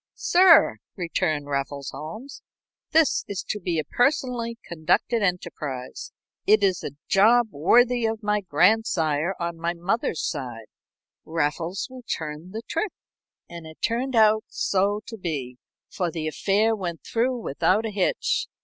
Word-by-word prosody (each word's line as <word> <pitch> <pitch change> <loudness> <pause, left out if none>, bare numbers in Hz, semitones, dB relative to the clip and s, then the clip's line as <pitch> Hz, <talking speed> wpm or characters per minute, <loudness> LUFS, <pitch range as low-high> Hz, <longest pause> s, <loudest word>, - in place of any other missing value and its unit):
"Sir," 345 - +5 0.2
returned 155 -4 -1
Raffles 140 0 -3
Holmes, 220 - -8 0.5
"this 320 -1 +3
is 200 -2 -4
to 210 - -1
be 175 -3 -2
a 155 - 0
personally 245 - 0
conducted 175 +8 0
enterprise. 150 -9 -3 0.4
It's 200 -4 +3
a 140 - -5
job 225 +4 +4
worthy 240 - +3
of 220 0 -4
my 210 0 +1
grandsire 170 -2 +2
on 170 -1 -4
my 170 +1 -1
mother's 175 0 -1
side. 125 -7 -5 0.6
Raffles 165 +3 -2
will 255 -1 -11
turn 160 -6 -5
the 220 +4 -6
trick." 370 +4 -2 0.5
And 170 -2 -9
it 160 - -13
turned 245 +3 0
out 215 -1 +5
so 200 +2 0
to 225 - -8
be, 140 -9 -4 0.3
for 180 -2 -2
the 160 -1 -4
affair 210 +7 +1
went 175 -5 -5
through 245 +2 0
without 205 +4 +1
a 220 - -3
hitch. 195 -3 0
190 Hz, 140 wpm, -25 LUFS, 160-225 Hz, 0.6 s, Sir